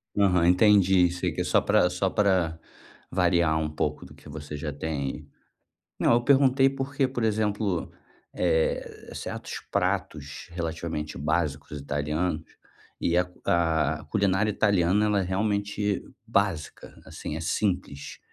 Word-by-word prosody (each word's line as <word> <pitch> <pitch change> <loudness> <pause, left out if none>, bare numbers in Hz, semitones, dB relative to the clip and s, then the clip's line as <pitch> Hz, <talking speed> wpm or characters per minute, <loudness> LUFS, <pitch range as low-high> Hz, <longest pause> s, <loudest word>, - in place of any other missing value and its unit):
Aham, 90 -4 +3
entendi, 95 -2 +5
sei, 90 - -2
que - - -3
é - - +1
só - - +3
pra 90 - +3
só 90 +2 0
pra 90 -6 +1 0.5
variar 85 -3 +2
um 75 -1 -1
pouco 75 -1 -3
do - - -13
que - - -16
você 75 0 -7
já 75 0 -4
tem. 70 -3 -4 0.7
Não, - - +4
eu 120 - +4
perguntei 135 -1 +5
porque, 135 0 -1
por 125 -3 -3
exemplo, 105 -4 0 0.4
eh, 80 0 -1
certos - - -6
pratos 75 -2 -2
relativamente 80 -4 -4
básicos 75 -1 -2
italianos 75 +3 -2 0.6
e 85 - +1
a 90 - +3
c 90 - -19
a 80 -3 +1
culinária 100 0 +2
italiana 100 -1 +2
ela 105 -1 +2
é - - 0
realmente 100 +1 -1 0.2
básica, 100 -7 -2
assim, 75 - -6
é 80 - -4
simples, 85 -5 -2
90 Hz, 135 wpm, -26 LUFS, 80-105 Hz, 0.7 s, entendi